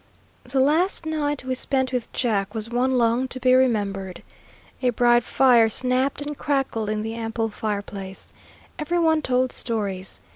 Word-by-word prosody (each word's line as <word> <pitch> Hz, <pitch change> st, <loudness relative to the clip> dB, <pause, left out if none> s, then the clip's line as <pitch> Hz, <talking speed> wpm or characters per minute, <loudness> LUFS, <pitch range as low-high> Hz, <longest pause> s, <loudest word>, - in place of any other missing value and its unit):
The 260 Hz, +2 st, -1 dB
last 320 Hz, +6 st, +2 dB
night 295 Hz, -3 st, -2 dB
we 260 Hz, 0 st, -2 dB
spent 260 Hz, 0 st, -1 dB
with 245 Hz, -2 st, -3 dB
Jack 210 Hz, -4 st, -1 dB
was 220 Hz, +1 st, -3 dB
one 255 Hz, +2 st, +1 dB
long 235 Hz, +2 st, +2 dB
to 255 Hz, -, -6 dB
be 255 Hz, 0 st, +3 dB
remembered. 200 Hz, -7 st, 0 dB, 0.6 s
A 250 Hz, -, +2 dB
bright 240 Hz, 0 st, +3 dB
fire 240 Hz, -3 st, +4 dB
snapped 255 Hz, +4 st, +1 dB
and 295 Hz, 0 st, -5 dB
crackled 270 Hz, -7 st, -1 dB
in 215 Hz, 0 st, -2 dB
the 225 Hz, +1 st, -4 dB
ample 225 Hz, 0 st, -3 dB
fireplace. 200 Hz, -2 st, -6 dB, 0.5 s
Every 335 Hz, +3 st, -1 dB
one 320 Hz, -2 st, +3 dB
told 255 Hz, -2 st, +1 dB
stories. 200 Hz, -5 st, -4 dB
245 Hz, 155 wpm, -23 LUFS, 220-265 Hz, 0.6 s, fire